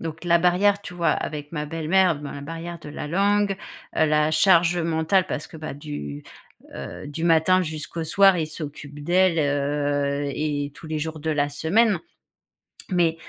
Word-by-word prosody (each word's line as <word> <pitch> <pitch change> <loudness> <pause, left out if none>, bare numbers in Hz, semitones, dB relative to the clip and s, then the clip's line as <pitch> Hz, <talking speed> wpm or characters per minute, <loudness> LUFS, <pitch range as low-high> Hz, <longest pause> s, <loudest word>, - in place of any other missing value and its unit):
Donc 165 0 -6
la 170 -1 +4
barrière, 195 +4 +3
tu 190 - -8
vois, 170 -1 +1
avec 150 0 -3
ma 150 -2 -3
belle-mère. 165 +1 +2
Ma 145 -1 -7
barrière 165 +3 -7
de 150 - -10
la 145 - -6
langue, 200 +4 +2 0.4
heu, - - +4
la 150 0 +2
charge 175 0 +4
mentale, 165 +3 +2
parce 150 - -3
que - - -12
bah, 155 0 -6
du, 75 - -7 0.5
heu, - - -7
du 150 +3 -6
matin 170 +3 +4
jusqu'au 160 0 -5
soir, 195 +3 +5
il 160 -2 -1
s'occupe 145 -2 -8
d’elle, 180 0 +3
heu 145 -1 0
et 145 -2 -2
tous 160 - -11
les 155 0 -2
jours 160 0 -4
de 160 +1 -2
la 145 -2 +1
semaine. 195 +9 +2 0.9
Mais 170 -3 +2
160 Hz, 170 wpm, -24 LUFS, 145-175 Hz, 0.9 s, soir